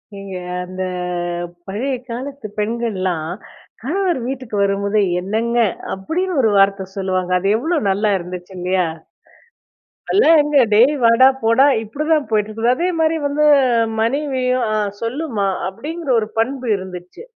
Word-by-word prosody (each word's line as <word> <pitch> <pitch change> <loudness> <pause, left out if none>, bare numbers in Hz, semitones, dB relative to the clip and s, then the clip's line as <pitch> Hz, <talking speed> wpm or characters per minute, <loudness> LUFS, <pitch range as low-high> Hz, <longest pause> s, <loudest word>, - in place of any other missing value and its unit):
இங்க 195 -1 -8 0.3
அந்த 185 +1 -7 0.9
பழைய 250 +8 -2
காலத்து 260 +1 -6
பெண்கள்லாம், 195 -7 -2 0.5
கணவர் 350 - 0
வீட்டுக்கு 255 -5 -5
வரும்போது 200 +1 +1 0.2
"என்னங்க" 225 +5 -1 0.4
அப்டின்னு 330 - -2
ஒரு 225 - +3
வார்த்த 195 0 +3
சொல்லுவாங்க. 185 -1 -1
அது 195 - -2
எவ்ளோ 320 +8 -1
நல்லா 205 +2 +1
இருந்துச்சு 180 +1 -8
இல்லையா. 180 -1 0 1.2
அதெல்லாம் 330 -6 +5
எங்கே 290 -3 +4
"டேய் 245 +8 +6
வாடா 230 +3 +6
போடா" 230 +5 +5 0.2
இப்படிதான் 300 +6 0
போயிட்டுருக்குது. 215 +3 +1
அதே 345 +7 0
மாதிரி 320 0 +2
வந்து 295 +1 +1 0.6
மனைவியும் 255 0 0
"அ - - +1 0.3
சொல்லுமா" 230 -3 -2 0.2
அப்படிங்கிற 300 - -5
ஒரு 215 -1 -4
பண்பு 255 +2 -1
இருந்துச்சு. 185 - -9
230 Hz, 120 wpm, -19 LUFS, 195-280 Hz, 1.2 s, டேய்